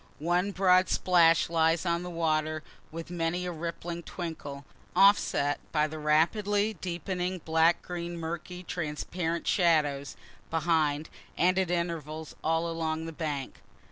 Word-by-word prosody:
One 175 +5 +1
broad 185 -1 +4
splash 170 -2 +4
lies 165 +1 +2
on 170 0 +1
the 180 - -5
water, 155 -2 0 0.3
with 165 +2 -7
many 175 +1 -1
a 180 - -2
rippling 170 +1 -5
twinkle, 155 -6 -6 0.3
offset 145 -8 +4
by 150 -1 +2
the 155 +1 -6
rapidly 200 +8 +2
deepening 180 +1 -3
black 160 +1 +3
green 175 -1 -5
murky 170 +2 -5
transparent 170 +1 -3
shadows 150 -6 +2 0.3
behind, 155 -2 +1 0.3
and 185 +2 +3
at 185 -2 0
intervals 160 -3 -3
all 165 +1 +1
along 160 -1 -2
the 165 - -5
banks. 150 -4 -4
165 Hz, 130 wpm, -29 LUFS, 155-180 Hz, 0.3 s, broad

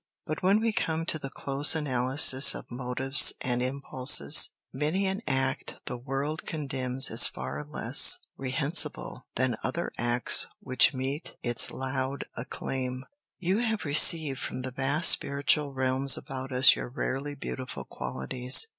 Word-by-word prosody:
But 155 - -5
when 195 +3 +3
we 225 -1 -1
come 165 -4 -2
to 160 - -2
the 135 - -7
close 140 +3 +1
analysis 130 -1 +4
of - - -11
motives 130 +2 +3
and 125 -1 -2
impulses, 130 - +4 0.2
many 155 +8 -1
an 190 +2 -3
act 135 -1 -2
the - - -5
world 135 +5 -5
condemns 135 -3 -2
is - - +5
far 65 +3 -7
less 75 - +4 0.2
reprehensible 140 +5 -4
than 125 -2 -1
other 170 +6 -3
acts 120 0 +2
which 130 - +2
meet 135 +4 -5
its 120 -1 +2
loud 130 +1 -4
acclaim. 130 +1 -5 0.3
You 190 +3 -1
have 220 -5 -2
received 145 -1 +3
from 130 - -5
the 130 - -5
vast 140 +6 +2
spiritual 140 +1 +1
realms 130 0 +2
about 135 0 -8
us 130 +1 +5
your - - -6
rarely 140 +3 -4
beautiful 130 -2 -7
qualities. 125 - -1
135 Hz, 140 wpm, -27 LUFS, 130-150 Hz, 0.3 s, is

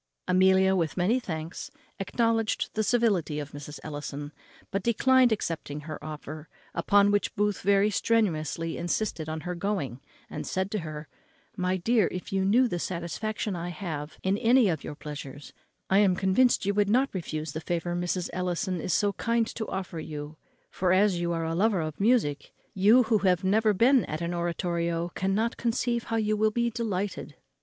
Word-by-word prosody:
Amelia, 190 +1 +4
with 165 -3 -1
many 205 +8 +2
thanks, 160 -7 -6 0.3
acknowledged 225 +2 0
the 220 - 0
civility 205 -10 +1
of 145 -1 -5
Mrs. 145 +1 -8
Ellison, 145 -1 -6 0.4
but 195 - -1
declined 250 +3 +4
accepting 160 -7 -3
her 155 0 -8
offer; 155 0 -8 0.2
upon 205 0 +4
which 205 0 0
Booth 205 -1 0
very 200 +2 +3
strenuously 165 -7 0
insisted 170 -2 -2
on 160 0 -4
her 180 +3 -4
going, 170 - -3 0.3
and - - -6
said 190 +1 -2
to 215 - -1
her, 155 -2 -7 0.5
"My 185 0 0
dear, 220 +2 +2
if 180 +1 -6
you 190 0 +1
knew 235 +7 +4
the 175 -6 -3
satisfaction 190 +4 -3
I 175 0 -4
have 155 -4 -5
in 195 +2 +1
any 240 -2 +5
of 160 -5 -2
your 150 - -6
pleasures, 145 -2 -8 0.3
I 195 - +4
am 195 -3 +4
convinced 200 +6 +3
you 200 - +1
would 205 0 +2
not 255 +5 +2
refuse 155 -4 -4
the 160 +2 -5
favour 175 +1 -2
Mrs. 175 0 -2
Ellison 180 0 -2
is 170 - -1
so 205 +2 +2
kind 230 +1 +1
to 220 - -4
offer 185 -3 -4
you; 150 0 -7 0.4
for, 185 -1 +1
as 190 -1 +3
you 170 0 -1
are 165 -1 -1
a 165 - -2
lover 200 +2 +2
of 155 -1 -5
music, 200 - +1 0.2
you, 215 +6 +5
who 220 -2 +2
have 185 -2 +2
never 215 +3 +3
been 240 +6 +4
at 155 +2 -5
an 170 +1 -2
oratorio, 170 0 -1
cannot 200 +5 0
conceive 235 0 -1
how 225 - -2
you 215 -1 +1
will 215 +1 +3
be 235 +2 0
delighted." 205 -4 -3
185 Hz, 180 wpm, -27 LUFS, 165-215 Hz, 0.5 s, any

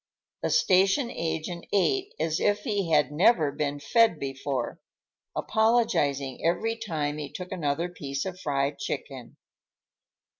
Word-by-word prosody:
The - - 0
station 195 - +3
agent 165 0 -4
ate 395 - +1
as 160 -1 0
if 205 0 +2
he 200 -5 -1
had 150 -3 +3
never 160 -1 +4
been 145 0 -2
fed 225 +3 +3
before, 135 +1 -3 0.6
apologizing 220 - +1
every 180 +7 +1
time 155 -9 -3
he 145 - -6
took 180 -1 -7
another 165 -2 -1
piece 140 -5 -5
of 185 -1 -5
fried 140 -2 -1
chicken. 130 -3 -6
165 Hz, 125 wpm, -27 LUFS, 145-205 Hz, 0.6 s, never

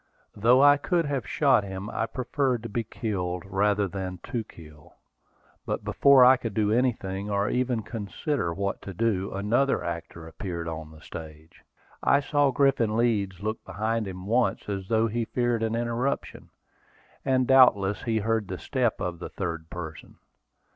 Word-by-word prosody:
Though 120 +6 +5
I 145 0 +7
could 165 +4 0
have 135 -8 -2
shot - - +3
him, 95 0 -6
I 115 - -1
preferred 125 0 -1
to 115 - -5
be 115 +2 -2
killed 90 -6 -3
rather 100 +1 +1
than 95 -1 -5
to 120 -2 -3
kill. 75 -6 -16 0.7
But - - -3
before 140 -2 +6
I 130 +1 +7
could 115 -5 -5
do 105 -1 +2
anything, 105 -5 0
or 100 0 0
even 125 -3 0
consider 110 - -3
what 100 +3 -3
to 95 - -8
do, 100 -2 0
another 115 +8 +1
actor 85 -1 -6
appeared 85 -1 -5
on 80 -1 -6
the 80 0 -15
stage. 80 0 -11 0.4
I 140 - +4
saw 145 0 +2
Griffin 125 -5 +2
Leeds 100 -5 0
look 110 +1 -3
behind 110 +3 -2
him 90 -1 -7
once, 120 +4 +1
as 100 -2 -4
though 110 +1 +2
he 115 +1 -1
feared 120 -1 0
an 115 0 0
interruption, 120 +3 -2 0.7
and 130 -1 +2
doubtless 115 -7 +5
he 115 -2 -1
heard 110 -1 0
the 95 - -5
step 125 -1 -1
of 90 -3 -3
the - - -6
third 85 -4 -5
person. 80 -3 -8
110 Hz, 165 wpm, -26 LUFS, 95-120 Hz, 0.7 s, I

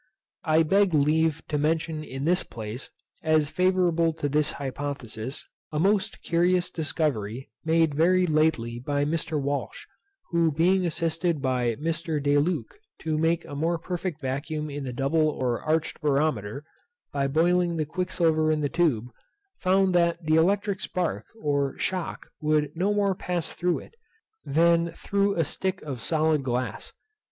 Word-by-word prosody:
I 160 +1 +4
beg 195 +1 +3
leave 155 +1 +2
to 150 - 0
mention 160 +1 0
in 135 -1 -5
this 180 +2 +3
place, 110 +3 -7 0.3
as 155 -2 +2
favourable 180 -3 +2
to 155 -2 -2
this 150 +1 +1
hypothesis, 135 -3 -5 0.3
a 150 - -3
most 195 +3 +1
curious 175 +1 +2
discovery 135 -8 -2
made 160 -1 +3
very 180 +5 +4
lately 155 -8 +1
by 145 +3 -1
Mr. 155 0 -1
Walsh, 140 0 -3 0.5
who 170 -2 +3
being 180 +4 +2
assisted 165 0 0
by 125 -3 0
Mr. 160 +1 -2
De 145 0 +3
Luc 180 - -2 0.2
to 160 -1 -1
make 165 +2 +1
a 145 - -9
more 165 +4 0
perfect 175 -1 -4
vacuum 150 +2 -3
in 140 -1 -5
the 125 - -3
double 145 +5 +2
or 125 -5 -1
arched 160 +1 -1
barometer, 140 -5 0 0.5
by 140 -1 +1
boiling 170 +3 +2
the 155 - 0
quicksilver 165 -2 +1
in 155 -1 0
the 145 - 0
tube, 130 -9 +1 0.5
found 190 0 +3
that 170 0 +2
the 155 - +2
electric 195 +4 +2
spark 180 -3 -2
or 140 -5 0
shock 185 -3 -3 0.2
would 150 -1 +1
no 190 +5 +1
more 200 -1 +2
pass 180 -2 -3
through 175 -1 0
it, - - -11 0.5
than 170 +2 +3
through 200 +2 0
a 165 - +1
stick 190 +5 -3
of 135 -6 -5
solid 155 +2 +2
glass. 125 -1 -3
155 Hz, 150 wpm, -26 LUFS, 145-170 Hz, 0.5 s, I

